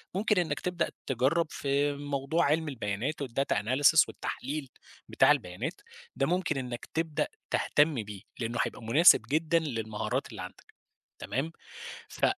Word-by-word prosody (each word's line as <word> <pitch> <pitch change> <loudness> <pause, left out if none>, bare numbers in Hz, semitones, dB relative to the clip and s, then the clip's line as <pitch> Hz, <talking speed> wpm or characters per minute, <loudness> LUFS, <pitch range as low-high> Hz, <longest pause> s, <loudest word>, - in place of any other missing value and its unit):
ممكن 205 +1 +2
إنّك 160 -5 0
تبدأ 180 -2 -1 0.2
تجرّب 135 +6 +2
في 140 +1 0
موضوع 145 +3 -1
علم 160 +2 +1
البيانات 125 +4 -3
والdata 135 +1 -1
analysis 135 +9 +5
والتحليل 140 0 -5 0.4
بتاع - - +5
البيانات، 90 0 -2 0.3
ده 135 +2 +1
ممكن 175 -2 0
إنّك 125 -2 -5
تبدأ 160 -2 0 0.2
تهتم 145 -6 +2
بيه، 100 -2 -9 0.2
لإنّه 115 0 -2
هيبقى - - -4
مناسب 145 +11 +7
جدًا 160 +3 +2
للمهارات 115 -9 -3
اللي - - -7
عندك، - - -11 0.5
تمام، 145 +6 -2 0.6
ف - - 0
140 Hz, 135 wpm, -29 LUFS, 125-160 Hz, 0.6 s, مناسب